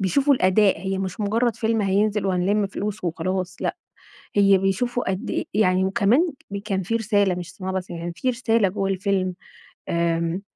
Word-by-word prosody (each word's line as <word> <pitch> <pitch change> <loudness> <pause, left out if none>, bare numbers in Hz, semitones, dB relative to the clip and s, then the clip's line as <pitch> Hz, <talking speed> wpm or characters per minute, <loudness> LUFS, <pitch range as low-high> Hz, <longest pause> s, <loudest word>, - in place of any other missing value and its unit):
بيشوفوا 275 +9 +3
الأداء، 190 -3 +3
هي 190 +1 -2
مش 190 +1 -4
مجرّد 225 +2 +1
فيلم 225 -1 0
هينزل 205 +1 +1
وهنلِم 195 +3 +1
فلوس 200 0 -5
وخلاص، 180 +2 -2
لأ، - - -1 0.6
هي 200 -1 +6
بيشوفوا 195 +5 0
قد 190 0 -3
إيه - - -1
يعني 190 -3 +3
وكمان 235 - +2 0.2
م 200 - -3
كان 200 -2 -2
في 225 +6 -1
رسالة، 205 -4 +2
مش 175 0 -7
صناعة 190 -1 -5
بس، 185 -1 -4
يعني 170 0 -5
في 255 - -1
رسالة 230 -4 +1
جوّه 195 +1 -2
الفيلم، 190 -1 0 0.6
آمم، 170 +1 0
195 Hz, 170 wpm, -23 LUFS, 185-215 Hz, 0.6 s, هي